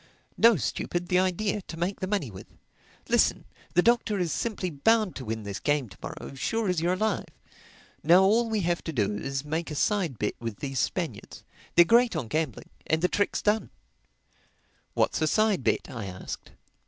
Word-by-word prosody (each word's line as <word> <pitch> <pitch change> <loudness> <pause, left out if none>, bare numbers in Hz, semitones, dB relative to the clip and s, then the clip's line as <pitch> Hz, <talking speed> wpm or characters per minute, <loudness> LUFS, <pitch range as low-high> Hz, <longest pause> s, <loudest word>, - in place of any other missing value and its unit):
"No, 230 0 +6
stupid. 175 - -2
The 180 - +4
idea—to 185 -1 -1
make 175 +4 -2
the 185 - -2
money 185 - -1
with. 95 - -11 0.6
Listen: - - +2 0.3
the 180 - +5
Doctor 235 -3 +2
is 175 -4 -1
simply 200 -6 -2
bound 215 +7 +2
to 130 - -6
win 110 0 -4
this 100 -1 -5
game 145 -5 0
to - - -15
morrow, - - -7
sure 215 - -1
as 180 -3 +1
you're 175 +2 +2
alive. 210 +1 -1 0.7
Now 175 +5 +6
all 225 +4 +3
we 220 -2 0
have 175 0 0
to 165 - -2
do 105 -7 0
is 135 0 -3
to - - -14
make 160 +2 -2
a 150 - -5
side 175 - 0
bet 105 - -1
with 115 -3 -5
these 135 -2 -3
Spaniards—they're 175 +8 -1
great 235 +2 +4
on 130 -8 -3
gambling—and 160 +1 -2
the 180 - +4
trick's 205 - 0
done." 215 +1 +1 1.3
"What's - - +1
a 155 - +3
side 215 +1 +2
bet?" - - +1
I 115 -6 -6
asked. 95 -1 -7
175 Hz, 180 wpm, -27 LUFS, 135-205 Hz, 1.3 s, No